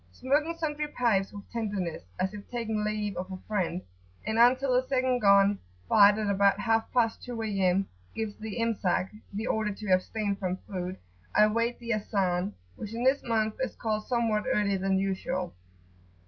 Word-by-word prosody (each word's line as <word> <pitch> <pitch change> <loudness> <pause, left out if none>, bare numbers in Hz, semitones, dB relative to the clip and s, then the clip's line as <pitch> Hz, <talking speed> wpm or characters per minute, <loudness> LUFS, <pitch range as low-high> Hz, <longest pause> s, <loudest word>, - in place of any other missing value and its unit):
Smoking 300 - 0
sundry 300 -2 -2
pipes 225 -9 +1
with 205 -1 -10
tenderness, 205 -7 -3 0.2
as 190 +1 0
if 205 -1 -9
taking 225 -3 -2
leave 210 -2 -2
of 185 +2 -5
a 185 - -4
friend; 185 -4 -1 0.4
and 220 +1 0
until 255 +2 +5
the 255 +1 +2
second 255 -2 +1
gun, 200 -1 +5 0.3
fired 205 - +6
at 215 -1 -1
about 200 0 +3
half 225 +1 +1
past 230 -3 +1
two 245 -2 -6
A.M., 195 -2 +1 0.3
gives 220 -2 -3
the 220 +1 -5
Imsak,[FN#4] 215 -2 0
the 215 +3 -3
order 220 -3 0
to 205 -1 -5
abstain 200 +2 +1
from 185 -2 -2
food, 185 -2 -4 0.4
I 210 - +7
wait 230 +3 0
the 235 -1 -2
Azan,[FN#5] 195 -3 0 0.3
which 215 +1 -6
in 235 - -2
this 265 +2 +3
month 220 -2 0
is 260 - -2
called 215 -2 -2
somewhat 230 -4 +1
earlier 200 -2 +1
than 190 0 +1
usual. 190 -2 -2
215 Hz, 175 wpm, -28 LUFS, 195-230 Hz, 0.4 s, I